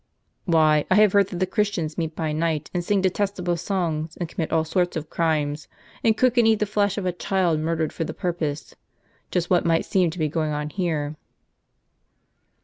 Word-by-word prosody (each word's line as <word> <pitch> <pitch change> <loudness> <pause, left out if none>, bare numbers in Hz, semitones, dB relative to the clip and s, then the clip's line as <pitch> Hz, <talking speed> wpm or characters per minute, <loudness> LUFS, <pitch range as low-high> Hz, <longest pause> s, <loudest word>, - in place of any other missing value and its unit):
" - - -50
" - - -49
Why, 155 -4 +4
I 185 - +4
have 210 -1 +5
heard 200 -2 +4
that 180 - -6
the 185 - +1
Christians 185 -6 -1
meet 160 -2 -3
by 160 -2 -2
night, 155 -1 -1
and 175 -1 -1
sing 200 +2 +1
detestable 185 -2 0
songs, 165 -3 -2
and 175 - -3
commit 160 0 -4
all 160 -1 +2
sorts 175 +1 0
of 155 0 -6
crimes; 150 -3 0 0.4
and 220 -1 +3
cook 255 -1 +3
and 230 - +5
eat 220 -1 +4
the 210 - 0
flesh 205 -1 0
of 200 - -2
a 180 - +1
child 175 -2 0
murdered 160 0 -1
for - - -2
the - - -4
pur 180 -3 -1
pose*— 155 -3 -4 0.6
just 175 0 -1
what 180 - +4
might 165 -1 +2
seem 185 -3 +2
to 165 - -8
be 155 -2 +1
going 155 0 -1
on 150 0 -3
here." 155 -5 -2
170 Hz, 215 wpm, -24 LUFS, 155-190 Hz, 0.6 s, have